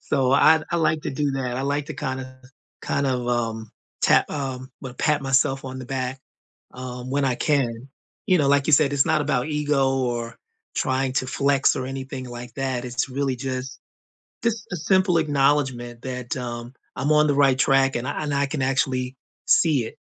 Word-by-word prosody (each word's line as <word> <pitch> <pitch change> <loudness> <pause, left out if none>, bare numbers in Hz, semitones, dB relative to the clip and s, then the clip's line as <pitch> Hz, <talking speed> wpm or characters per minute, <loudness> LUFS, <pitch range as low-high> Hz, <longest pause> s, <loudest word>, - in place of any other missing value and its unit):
So, 135 -2 +1
I 155 +3 +6
d 155 - -9
I 170 - +1
like 155 -2 +1
to - - -3
do 140 0 -1
that, 125 -2 -2
I 135 - -2
like 145 +1 -1
to 155 - -6
kind 130 -3 -3
of 130 - -6 0.5
kind 140 0 -1
of, 125 -2 -1
um, 115 -2 -2 0.3
tap - - +4
um, 130 -2 -4
well, 130 -2 -8
pat 150 +1 +1
myself 135 0 +2
on 130 0 -6
the 130 - -6
back, 130 0 -3 0.5
um, 125 0 -7
when 140 +1 +1
I 130 -2 +1
can. 130 -3 0 0.4
You 185 -4 +4
know, 140 -3 +2
like 140 -1 +3
you 155 - +1
said, 145 0 +5
it's 140 -1 +3
not - - +2
about 145 -1 0
ego, 145 -3 +1
or 120 -2 -2 0.4
trying 130 0 0
to 130 - 0
flex, 140 +1 +2
or 130 - -3
anything 135 -1 -6
like 120 0 -8
that, 130 -2 -2
it's 125 +3 -2
really 135 -1 -1
just 130 +1 -4 0.7
just 230 -3 0
a 180 - -2
simple 185 +1 +3
acknowledgement 135 -5 +1
that, 125 -2 -4
um, 120 -1 -5 0.2
I'm 145 - 0
on 150 0 +5
the 145 - +3
right 140 -2 +4
track 135 0 +3
and 120 +2 -2
I 145 +2 -3
and 145 - -2
I 140 0 +2
can, 145 0 -3
actually, 130 -1 0 0.3
see 150 -8 +3
it. - - -9
135 Hz, 200 wpm, -24 LUFS, 125-145 Hz, 0.7 s, I